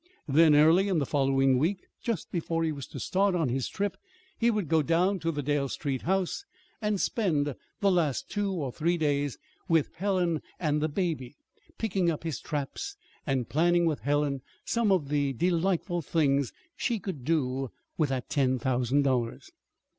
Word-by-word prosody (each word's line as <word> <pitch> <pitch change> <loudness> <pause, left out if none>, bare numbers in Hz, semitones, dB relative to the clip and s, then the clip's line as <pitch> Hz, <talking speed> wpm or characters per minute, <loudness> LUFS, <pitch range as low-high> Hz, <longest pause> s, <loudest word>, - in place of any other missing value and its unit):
Then, 155 +2 +6
early 165 +6 +6
in 190 -4 +1
the 145 - +1
following 135 -2 +3
week, 180 +6 0 0.2
just 230 -8 -3
before 165 -1 -1
he 160 - +1
was 140 -3 -6
to - - -8
start 195 0 +1
on 165 -7 +1
his 130 +1 -1
trip 205 0 -2 0.4
he 235 - +2
would 210 -7 0
go 160 0 +3
down 180 +6 +2
to 165 0 -1
the 145 -2 -3
Dale 140 -1 0
Street 135 -2 -3
house 190 - 0 0.4
and 210 -2 0
spend 150 - +1 0.3
the 200 -1 +4
last 160 -8 +1
two 205 -1 -1
or 150 -9 -2
three 170 +6 0
days 145 -3 0 0.3
with 165 -3 +2
Helen 180 -4 0 0.2
and 150 -3 +1
the 155 - +1
baby, 150 -6 -2 0.4
picking 190 -5 +1
up 160 -2 -2
his 165 -4 -3
traps, 165 - -4 0.3
and 130 -3 0
planning 175 +3 +3
with 155 -3 +1
Helen 145 -1 0 0.2
some 230 -3 +1
of 165 -8 +2
the 145 -2 +1
delightful 175 - 0
things 140 -3 +1 0.2
she 235 -3 0
could 180 - -6
do 135 -3 0 0.3
with 155 -4 +1
that 130 -2 -2
ten 130 -2 +1
thousand 130 +2 +1
dollars. 130 - -1
160 Hz, 175 wpm, -28 LUFS, 140-180 Hz, 0.4 s, Then